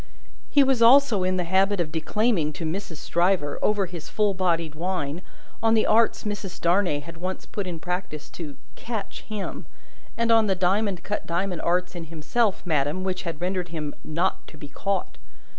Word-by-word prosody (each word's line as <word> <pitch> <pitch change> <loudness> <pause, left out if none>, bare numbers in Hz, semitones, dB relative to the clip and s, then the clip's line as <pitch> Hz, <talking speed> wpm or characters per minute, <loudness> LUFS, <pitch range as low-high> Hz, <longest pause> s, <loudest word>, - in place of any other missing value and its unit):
He 285 - +6
was 265 -3 +2
also 235 -3 +6
in 185 0 +1
the 180 - +1
habit 190 +3 +2
of 160 -3 -1
declaiming 165 0 +1
to 165 - -5
Mrs. 175 +1 -4
Stryver, 170 -3 +1
over 205 -2 +2
his 170 -3 -8
full 210 -2 +2
bodied 170 -4 0
wine, 170 -2 -2 0.4
on 225 0 +4
the 220 - +3
arts 225 +1 +3
Mrs. 205 -3 -4
Darnay 175 -4 +2
had 170 +3 -10
once 185 +2 -4
put 200 -3 -4
in 170 -2 -4
practice 180 -3 -4
to 150 -5 -7 0.2
"catch" 220 -4 -5
him, 210 -3 -5 0.5
and 230 0 +2
on 225 -1 +5
the 190 - +2
diamond 190 0 +1
cut 205 - -3
diamond 175 +1 -1
arts 180 +1 +1
in 170 -2 -6
himself, 170 +7 0
madam, 150 +2 0
which 185 -1 -2
had 165 -4 -5
rendered 180 -1 -1
him 155 -3 -4
"not 170 +5 -1
to 155 - -13
be 145 -1 -9
caught." 195 +4 -3
185 Hz, 180 wpm, -25 LUFS, 165-205 Hz, 0.5 s, He